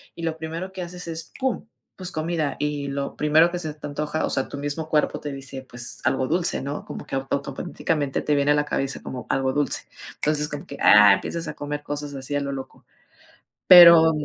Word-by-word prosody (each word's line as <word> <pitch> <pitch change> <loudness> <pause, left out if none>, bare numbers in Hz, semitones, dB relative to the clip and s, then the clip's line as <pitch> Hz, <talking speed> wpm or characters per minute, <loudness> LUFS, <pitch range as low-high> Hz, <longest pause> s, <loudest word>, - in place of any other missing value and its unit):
y 170 - -8
lo 160 -1 -2
primero 165 +4 -6
que 190 -1 -7
haces 180 0 -7
es, 165 0 -6
pum, 260 -4 -2 0.3
pues, 185 -1 -1
comida. 155 -3 -2
Y 145 -1 -2
lo 140 0 -4
primero 155 +3 +4
que 180 - -3
se 155 -3 -5
te 150 - -10
antoja, 150 +2 -2
o - - -3
sea, 135 - +1
tu 145 - -8
mismo 145 +2 -4
cuerpo 150 -1 +1
te 145 - -6
dice: 135 -1 -7
"Pues, 120 -1 -4
algo 130 0 +1
dulce, 170 +3 0
¿no?". 140 +2 -5
Como - - -8
que - - -5
auto 135 +1 -1
automáticamente 140 +1 -3
te 150 - +1
viene 140 +1 +2
a - - +4
la 150 0 +1
cabeza 135 -1 -2
como 125 -1 -7
algo 130 -1 0
dulce. 145 -1 0 0.7
Como 145 0 -6
que, 140 - -9
ah, 105 -1 +8
empiezas 165 +10 -3
a 150 - -4
comer 145 0 -5
cosas 145 0 -5
así 135 +2 -5
a - - +2
lo 140 0 -3
loco. 135 -1 -8 0.8
Pero 170 -2 +10
150 Hz, 215 wpm, -23 LUFS, 140-165 Hz, 0.8 s, Pero